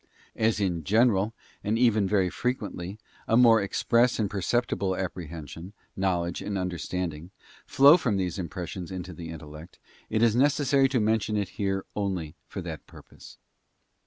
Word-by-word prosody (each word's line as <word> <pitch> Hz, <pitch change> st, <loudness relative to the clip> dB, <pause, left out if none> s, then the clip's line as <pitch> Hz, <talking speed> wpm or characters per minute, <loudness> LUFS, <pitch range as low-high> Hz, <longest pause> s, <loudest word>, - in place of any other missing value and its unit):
As 110 Hz, -1 st, +1 dB
in 90 Hz, -5 st, -1 dB
general, 110 Hz, -, +2 dB, 0.3 s
and 105 Hz, +2 st, 0 dB
even 110 Hz, -5 st, +3 dB
very 95 Hz, -3 st, +2 dB
frequently, 105 Hz, -6 st, -3 dB, 0.3 s
a 115 Hz, -, +3 dB
more 115 Hz, -3 st, +6 dB
express 115 Hz, +5 st, +2 dB
and 105 Hz, -3 st, -1 dB
perceptible 100 Hz, -2 st, 0 dB
apprehension, 85 Hz, -1 st, -6 dB, 0.2 s
knowledge, 90 Hz, -3 st, -1 dB
and 100 Hz, -1 st, -3 dB
understanding, 90 Hz, -2 st, -4 dB, 0.4 s
flow 140 Hz, +5 st, +7 dB
from 115 Hz, -, 0 dB
these 90 Hz, -1 st, -2 dB
impressions 90 Hz, 0 st, -5 dB
into 90 Hz, -1 st, -6 dB
the 80 Hz, 0 st, -8 dB
intellect, 80 Hz, +1 st, -10 dB, 0.3 s
it 110 Hz, +1 st, +1 dB
is 115 Hz, -2 st, +4 dB
necessary 140 Hz, 0 st, +3 dB
to 130 Hz, -2 st, +1 dB
mention 110 Hz, 0 st, +1 dB
it 100 Hz, -3 st, -1 dB
here 95 Hz, -1 st, -2 dB
only 95 Hz, -7 st, -2 dB
for -, -, -6 dB
that -, -, -7 dB
purpose. -, -, -15 dB
100 Hz, 145 wpm, -27 LUFS, 90-115 Hz, 0.4 s, flow